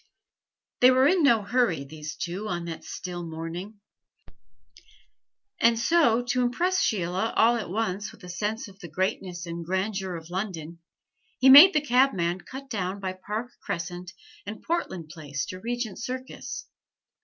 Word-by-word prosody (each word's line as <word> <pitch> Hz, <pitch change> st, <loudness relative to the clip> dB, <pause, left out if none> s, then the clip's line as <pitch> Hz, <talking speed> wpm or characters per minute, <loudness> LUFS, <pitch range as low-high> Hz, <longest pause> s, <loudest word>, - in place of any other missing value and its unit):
They 250 Hz, -, +8 dB
were 260 Hz, +1 st, +5 dB
in 365 Hz, +3 st, +3 dB
no 235 Hz, -8 st, +4 dB
hurry, 205 Hz, -, +1 dB
these 150 Hz, +2 st, -8 dB
two, 185 Hz, +5 st, -4 dB
on 175 Hz, -3 st, -3 dB
that 165 Hz, -1 st, -6 dB
still 175 Hz, -1 st, -6 dB
morning; 170 Hz, +6 st, -7 dB, 1.8 s
and 230 Hz, 0 st, +4 dB
so, 245 Hz, -3 st, +3 dB
to 245 Hz, +1 st, 0 dB
impress 355 Hz, +11 st, +1 dB
Sheila 190 Hz, -, 0 dB
all 230 Hz, +2 st, +5 dB
at 225 Hz, -6 st, -4 dB
once 205 Hz, 0 st, -2 dB
with -, -, -18 dB
a -, -, -9 dB
sense 210 Hz, +6 st, -3 dB
of 195 Hz, -1 st, -16 dB
the 175 Hz, -, -8 dB
greatness 180 Hz, +1 st, -2 dB
and 170 Hz, 0 st, -5 dB
grandeur 190 Hz, +1 st, -2 dB
of 165 Hz, +1 st, -9 dB
London, 175 Hz, -4 st, -4 dB, 0.6 s
he 260 Hz, +1 st, +5 dB
made 305 Hz, +9 st, +11 dB
the 305 Hz, -, +4 dB
cabman 235 Hz, -, +2 dB
cut 270 Hz, +6 st, -9 dB
down 195 Hz, -5 st, -3 dB
by 190 Hz, -1 st, -3 dB
Park 210 Hz, +6 st, -5 dB
Crescent 175 Hz, -1 st, -5 dB, 0.3 s
and 205 Hz, +2 st, -8 dB
Portland 190 Hz, -, -3 dB
Place 150 Hz, -4 st, -5 dB
to 185 Hz, -, -6 dB
Regent 235 Hz, -1 st, -4 dB
Circus. 255 Hz, +2 st, -6 dB
195 Hz, 155 wpm, -26 LUFS, 175-245 Hz, 1.8 s, made